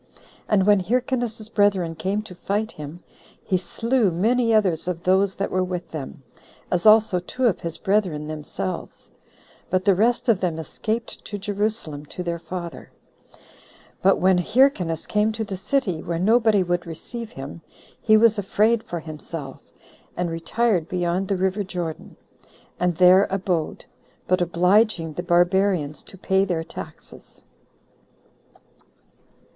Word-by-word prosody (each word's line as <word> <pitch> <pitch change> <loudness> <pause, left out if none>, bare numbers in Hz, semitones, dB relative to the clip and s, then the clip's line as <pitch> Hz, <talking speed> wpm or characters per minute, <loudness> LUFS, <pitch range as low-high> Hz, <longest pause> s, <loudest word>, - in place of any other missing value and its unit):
And 195 -3 +3
when 205 -1 +5
Hyrcanus's 240 +1 -1
brethren 200 -6 +2
came 195 +5 -2
to 200 - -10
fight 205 +5 -2
him, 150 +3 -9 0.4
he 190 - 0
slew 230 +5 +1
many 230 +7 +1
others 190 -7 +2
of 175 -1 -3
those 190 +1 +2
that 195 - -3
were 185 0 +1
with 180 -1 -5
them, 140 -3 -7 0.5
as 180 +3 +2
also 215 -4 +6
two 250 +8 -3
of 225 - +2
his 170 -1 -5
brethren 190 -7 0
themselves; 150 -11 -6 0.6
but 185 0 0
the 200 - +6
rest 235 +7 +1
of 225 -5 +4
them 175 -4 -1
escaped 220 +8 -4
to 205 - -5
Jerusalem 200 -7 -2
to 180 - -6
their 170 -1 -3
father. 175 -1 -7 1.1
But 195 +1 +4
when 185 0 +3
Hyrcanus 190 - +2
came 210 +1 +1
to 220 0 -3
the 205 -2 -5
city, 190 - -1
where 170 -1 -3
nobody 215 +1 +3
would 175 -1 -2
receive 225 +8 -7
him, 135 +5 -8 0.4
he 215 -1 +5
was 220 -1 +4
afraid 215 +3 +2
for 175 -5 -5
himself, 155 -2 -8 0.6
and 175 -1 -1
retired 175 +1 0
beyond 180 +1 -1
the 195 - 0
river 190 +2 0
Jordan, 175 -4 -5 0.6
and 180 -1 +1
there 185 +2 +6
abode, 185 -4 -2 0.4
but 185 0 +2
obliging 175 0 +2
the 175 - -4
barbarians 175 -3 +2
to 190 - -13
pay 190 +1 +2
their 175 -4 -1
taxes. 160 - -11
185 Hz, 140 wpm, -23 LUFS, 170-215 Hz, 1.1 s, also